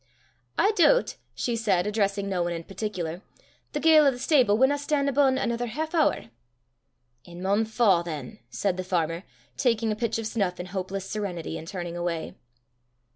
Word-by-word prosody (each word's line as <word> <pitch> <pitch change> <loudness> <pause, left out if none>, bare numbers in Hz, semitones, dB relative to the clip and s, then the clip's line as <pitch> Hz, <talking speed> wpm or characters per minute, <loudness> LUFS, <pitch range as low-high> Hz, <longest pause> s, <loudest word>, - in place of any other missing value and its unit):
"I 410 - +4
doobt," 440 +5 +3 0.2
she 240 - -1
said, 200 -6 +1
addressing 200 -1 0
no 185 -3 -1
one 175 0 -1
in 165 0 -5
particular, 185 -3 -4 0.5
"the - - -1
ga'le 310 -2 +6
o' - - +7
the 255 - -3
stable 250 -6 +3
winna 265 +4 +3
stan' 285 -1 0
abune 275 -1 +3
anither 240 -1 -1
half 310 +7 -3
hoor." 315 - +1 0.9
"It 175 - -13
maun 195 +5 +1
fa' 215 -5 +3
than," 150 -7 -7
said 190 +7 -1
the 185 - -2
farmer, 170 -1 -1 0.3
taking 230 -3 +1
a - - -1
pinch 230 +1 -1
of 225 - -4
snuff 200 -5 -1
in 180 - -4
hopeless 190 +1 -4
serenity, 195 -7 -4
and 160 0 -7
turning 175 -2 -5
away. 175 -2 -3
205 Hz, 175 wpm, -26 LUFS, 175-245 Hz, 0.9 s, o